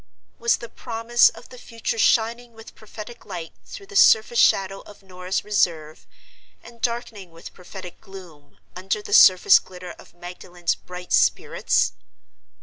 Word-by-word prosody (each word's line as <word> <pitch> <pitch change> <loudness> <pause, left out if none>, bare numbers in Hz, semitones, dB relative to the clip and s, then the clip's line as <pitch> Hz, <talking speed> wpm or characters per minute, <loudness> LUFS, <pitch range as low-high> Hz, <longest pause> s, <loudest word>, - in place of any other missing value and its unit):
Was 465 0 +2
the 235 - -9
promise 235 0 +1
of - - -15
the 250 - -13
future 230 -1 -5
shining 235 +1 +1
with 225 0 -14
prophetic 215 +2 -12
light 175 -5 -8
through 395 - -10
the 400 - -14
surface 230 - +4
shadow 195 0 +2
of 205 -1 -16
Norah's 185 0 -5
reserve, 165 -7 -1 0.6
and 235 0 -16
darkening 235 -5 -4
with 165 0 -13
prophetic 180 0 -12
gloom, 170 -7 -15 0.2
under 190 +3 -3
the - - -6
surface 185 +1 +7
glitter 180 -1 -11
of - - -17
Magdalen's 175 0 -5
bright 180 0 -9
spirits? - - +1
195 Hz, 145 wpm, -22 LUFS, 180-230 Hz, 0.6 s, surface